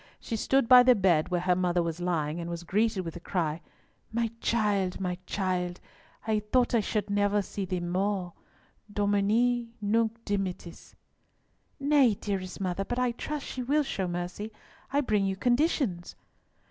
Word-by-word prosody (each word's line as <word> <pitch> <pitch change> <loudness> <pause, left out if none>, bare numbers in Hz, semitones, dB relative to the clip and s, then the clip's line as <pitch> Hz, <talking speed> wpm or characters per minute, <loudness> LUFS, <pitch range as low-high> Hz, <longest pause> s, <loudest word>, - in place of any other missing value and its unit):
She 230 - -4
stood 265 +3 +2
by 250 0 +9
the 250 0 +6
bed 180 -6 +2
where 180 -1 0
her 180 0 +2
mother 175 -1 +1
was 165 0 -3
lying, 165 -3 -1
and 170 0 -5
was 170 0 -5
greeted 210 +2 +1
with 165 - -5
the - - -8
cry, 165 -3 -2 0.5
"My 230 0 0
child, 205 -5 +1
my 180 -2 -2
child! 180 -2 -1 0.5
I 220 -1 +1
thought 240 +4 +1
I 230 - +4 0.3
never 205 0 +1
should - - -13
see 195 +1 -4
thee 180 -1 -2
more. 180 +1 -1 0.6
Domine, 215 +4 +1
nunc 225 +2 0
dimittis!" 190 -4 -4 0.8
"Nay, 280 -6 +4
dearest 190 -2 -4
mother, 190 0 -1
but 245 +5 -4
I 250 -1 +2
trust 295 +4 -5
she 255 - -5
will 290 +5 +2
show 195 -9 -2
mercy. 175 +5 -4 0.4
I 285 +1 +2
bring 210 -7 +1
you 190 - -1
conditions." 240 - 0
200 Hz, 160 wpm, -28 LUFS, 180-230 Hz, 0.8 s, by